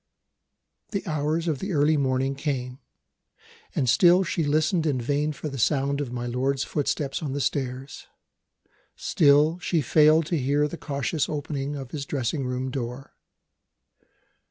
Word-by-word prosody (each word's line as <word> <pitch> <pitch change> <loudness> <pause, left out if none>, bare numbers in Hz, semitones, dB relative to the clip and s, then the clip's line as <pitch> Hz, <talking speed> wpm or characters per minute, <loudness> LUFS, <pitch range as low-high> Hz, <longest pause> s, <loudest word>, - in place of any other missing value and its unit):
The 200 -2 -3
hours 155 +1 -1
of 150 -5 0
the 195 -1 -3
early 150 +1 +3
morning 135 -1 +1
came; 135 -3 -3 1.0
and 130 - +1
still 175 +8 +5
she 170 -2 -1
listened 155 +3 +1
in 135 -4 0
vain 145 +5 0
for 150 +1 -6
the 135 -2 -5
sound 140 +3 +1
of 135 -4 -4
my 120 -1 -4
lord's 130 +3 0
footstep 145 -1 -2
on 145 -4 -3
the 145 - -2
stairs; 135 -1 -3 0.9
still 150 +3 +3
she 175 -1 0
failed 155 +3 +4
to 170 0 -1
hear 145 +3 +1
the 150 - -6
cautious 145 0 -2
opening 145 -1 -3
of 135 -3 -7
his 140 -2 -5
dressing 135 0 -2
room 130 +1 -3
door. 125 0 -5
145 Hz, 150 wpm, -25 LUFS, 135-155 Hz, 1.0 s, still